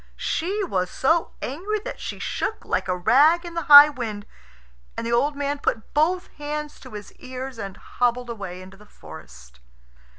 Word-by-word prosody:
She 395 +5 -2
was 185 - -1
so 325 +5 +1
angry 370 +11 -3
that - - -6
she - - -6
shook 440 - -4
like - - -1
a 180 -1 -1
rag 300 - +4
in 345 - -7
the 335 - -2
high 290 0 +11
wind, 220 -7 -6 0.7
and - - -3
the 235 - -1
old 285 +5 +2
man 285 0 -2
put 220 -5 -3
both 350 +5 +1
hands 300 0 -5
to - - -13
his 210 -1 -9
ears 255 -1 -7
and 195 -3 -6
hobbled 245 0 -1
away 185 -5 -7
into 190 +1 -14
the 210 +1 -18
forest. 60 - -14
260 Hz, 175 wpm, -23 LUFS, 205-300 Hz, 0.7 s, high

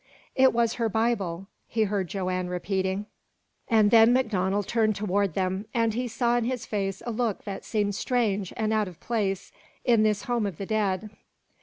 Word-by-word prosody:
"It 265 0 +5
was 230 -1 +1
her 225 - +2
Bible," 200 -5 -1 0.2
he 220 -1 +1
heard 200 -3 -1
Joanne 185 -1 -2
repeating; 190 +2 -1 0.6
and 215 -3 +4
then 225 0 +7
MacDonald 205 -6 +1
turned 220 -2 +2
toward 200 -3 0
them, 190 +2 -1
and 230 -2 +2
he 245 +2 -2
saw 240 +1 +1
in 240 - 0
his 250 -1 -2
face 195 -2 -3
a 240 - -2
look 225 -2 -1
that 200 -2 -6
seemed 205 -2 -1
strange 205 -4 0
and 220 -1 0
out 215 -2 +1
of 175 -2 -11
place 200 -5 -2 0.3
in 230 -3 +4
this 215 -1 +2
home 240 -4 0
of 185 -6 -6
his 195 - -6
dead. 210 -1 0
210 Hz, 180 wpm, -27 LUFS, 195-230 Hz, 0.6 s, then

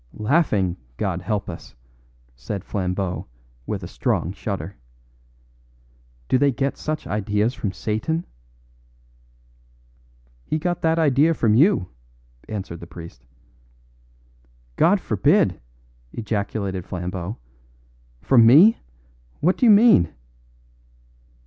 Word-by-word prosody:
"Laughing, 105 - +1 0.2
God 90 -3 -2
help 100 +2 -2
us!" 85 - -9 0.6
said 100 - -6
Flambeau 90 -3 -3 0.4
with - - -4
a - - -5
strong 85 - -1
shudder. 100 0 -5 1.5
"Do 130 - +2
they 145 -1 +3
get 135 +2 -2
such 155 0 -4
ideas 105 +3 0
from 105 -6 -3
Satan?" 115 - -2 2.2
"He 155 - -2
got 175 +2 -2
that 160 0 +2
idea 155 +1 +3
from 110 -6 +2
you," 145 - +4 0.6
answered 95 -5 -5
the 85 - -10
priest. 80 -8 -12 1.5
"God - - +4
forbid!" - - +1 0.5
ejaculated 100 -3 -3
Flambeau. 90 +2 -5 0.8
"From 125 -4 +5
me! 155 - +7 0.6
What 180 +5 +2
do 250 - +3
you - - +8
mean!" 205 - +6
105 Hz, 100 wpm, -22 LUFS, 95-150 Hz, 2.2 s, you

